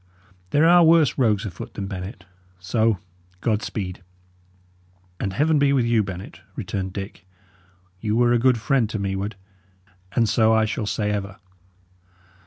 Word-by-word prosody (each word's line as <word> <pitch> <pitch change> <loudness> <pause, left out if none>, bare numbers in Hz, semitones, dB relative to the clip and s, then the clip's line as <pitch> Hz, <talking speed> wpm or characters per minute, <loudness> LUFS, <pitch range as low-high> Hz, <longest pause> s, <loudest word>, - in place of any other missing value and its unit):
There 150 - +4
are 175 0 +7
worse 160 -3 +5
rogues 110 -4 +2
afoot 95 -5 -8
than 100 - -4
Bennet. 95 0 -7 0.3
So, 110 +4 +1 0.4
God 110 +2 0
speed!" 95 -7 -5 1.2
"And 95 - -2
Heaven 150 +7 +2
be 140 -1 +3
with 130 -4 +2
you, 115 -2 +3
Bennet!" 95 -2 -7
returned 95 -1 -4
Dick. 95 -2 -7 0.7
"Ye 105 0 -2
were 120 +2 +3
a 120 - +3
good 125 0 +3
friend 120 -1 +1
to 110 - -3
me 100 -1 -2
ward, 100 +2 -4 0.8
and 115 -2 +2
so 110 0 +3
I 110 0 +3
shall 110 0 -3
say 105 -1 -1
ever." 100 -1 -4
110 Hz, 155 wpm, -23 LUFS, 100-120 Hz, 1.2 s, are